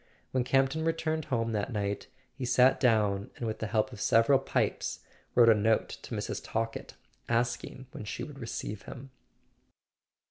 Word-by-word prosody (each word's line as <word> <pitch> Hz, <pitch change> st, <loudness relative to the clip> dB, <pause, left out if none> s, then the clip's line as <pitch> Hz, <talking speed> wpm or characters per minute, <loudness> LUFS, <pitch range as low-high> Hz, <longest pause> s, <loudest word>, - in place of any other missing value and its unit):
When 130 Hz, -1 st, +1 dB
Campton 135 Hz, +4 st, +2 dB
returned 160 Hz, -1 st, -1 dB
home 115 Hz, -5 st, 0 dB
that 110 Hz, +4 st, -1 dB
night 100 Hz, -2 st, -2 dB, 0.3 s
he 135 Hz, -, -7 dB
sat 125 Hz, +1 st, +4 dB
down 105 Hz, -5 st, +2 dB
and, 120 Hz, -, -4 dB
with 110 Hz, -1 st, -3 dB
the 110 Hz, -, -2 dB
help 110 Hz, 0 st, +1 dB
of 105 Hz, -, -8 dB
several 120 Hz, +4 st, +5 dB
pipes, 135 Hz, -, -1 dB, 0.3 s
wrote 120 Hz, -1 st, +7 dB
a -, -, +9 dB
note 110 Hz, +1 st, +2 dB
to -, -, -7 dB
Mrs. -, -, -3 dB
Talkett 115 Hz, 0 st, -3 dB, 0.3 s
asking 120 Hz, +2 st, -1 dB
when -, -, -7 dB
she -, -, -4 dB
would 145 Hz, -2 st, -9 dB
receive 110 Hz, -4 st, -5 dB
him. 135 Hz, +1 st, -9 dB
120 Hz, 165 wpm, -30 LUFS, 110-135 Hz, 0.3 s, a